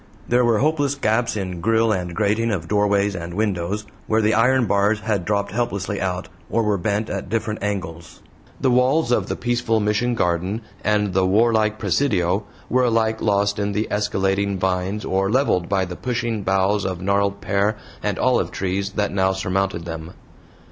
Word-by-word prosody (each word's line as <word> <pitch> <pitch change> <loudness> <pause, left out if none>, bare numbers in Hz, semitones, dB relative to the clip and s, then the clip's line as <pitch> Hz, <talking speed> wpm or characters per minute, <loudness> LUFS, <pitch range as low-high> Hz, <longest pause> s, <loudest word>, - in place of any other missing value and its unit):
There 125 +1 +3
were 120 -2 +3
hopeless 145 +1 +1
gaps 115 -3 0
in 90 -3 -4
grille 115 +3 +2
and 90 -4 -2
grating 110 +2 +1
of 90 -7 -2
doorways 100 0 +2
and 85 0 -6
windows, 100 -1 -1 0.2
where 110 0 +2
the 110 +1 +3
iron 125 +3 +3
bars 100 +1 +2
had 105 -4 -1
dropped 100 0 0
helplessly 100 -3 -2
out, 90 -1 -2 0.2
or 115 - +1
were 105 -2 +1
bent 105 +3 -1
at 100 -3 -4
different 110 0 -2
angles. 85 -5 -4 0.4
The 130 -2 +2
walls 125 +3 +3
of - - +1
the - - -2
peaceful 120 -2 0
Mission 105 +4 +1
garden 90 +2 0 0.2
and 105 -2 +1
the 95 0 +2
warlike 110 +1 +3
presidio 100 - +1 0.2
were 125 0 +2
alike 110 -1 +1
lost 100 0 +1
in 100 0 -1
the 105 +2 -1
escalading 100 -1 0
vines 95 +2 -1
or 95 +1 0
leveled 110 -8 +1
by 95 -2 +1
the 90 0 -7
pushing 120 -2 -2
boughs 95 +1 +1
of 95 -2 -3
gnarled 100 +1 0
pear 100 +2 0 0.2
and - - -1
olive - - +2
trees 95 +1 -2
that 105 -1 0
now 95 -1 +2
surmounted 95 -2 -1
them. 80 0 -7
100 Hz, 175 wpm, -22 LUFS, 95-110 Hz, 0.4 s, There